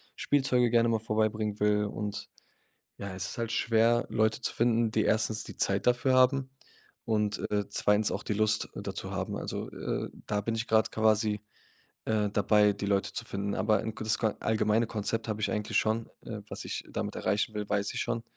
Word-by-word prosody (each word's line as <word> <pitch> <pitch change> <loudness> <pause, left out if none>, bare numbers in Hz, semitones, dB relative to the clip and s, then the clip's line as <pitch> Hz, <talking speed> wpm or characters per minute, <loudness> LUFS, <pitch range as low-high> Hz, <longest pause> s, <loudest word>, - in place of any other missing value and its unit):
Spielzeuge 125 -4 +2
gerne 115 0 +3
mal 115 -1 +2
vorbeibringen 110 -1 -1
will. 105 0 +3
Und, 105 0 -5 0.7
ja, 100 -1 -5
es 95 0 -3
ist - - -8
halt 115 -1 -2
schwer, 115 0 +3
Leute 110 +1 +1
zu - - -1
finden, 115 -1 +2
die 110 0 +1
erstens 110 0 +1
die - - -10
Zeit 100 +3 0
dafür 125 +2 +3
haben 130 +1 +4 0.5
und, 105 -2 0
äh, 105 -1 0
zweitens 105 +1 +2
auch - - -3
die 105 - -1
Lust 105 0 +1
dazu - - -5
haben. - - -3
Also, - - -4
äh, - - -3 0.2
da 105 -1 0
bin 115 +3 -2
ich 115 +1 -2
grad 110 -1 +3
quasi, 110 -1 +2 0.7
äh, 105 -2 +1
dabei, 105 0 +4
die 100 0 -5
Leute 100 0 0
zu - - -4
finden. 100 +1 -3
Aber 105 +2 +2
'n 110 -1 -5
gutes 110 0 0
Kon 110 -2 0
allgemeine 110 +1 +2
Konzept 110 +1 -2
habe 110 -1 -2
ich - - 0
eigentlich 105 -1 -1
schon. 110 +1 0
Äh, - - -6
was - - -6
ich - - -4
damit - - -3
erreichen 105 +2 0
will, 105 -1 -4
weiß 100 0 0
ich - - -2
schon. 115 - -2
110 Hz, 195 wpm, -29 LUFS, 105-115 Hz, 0.7 s, haben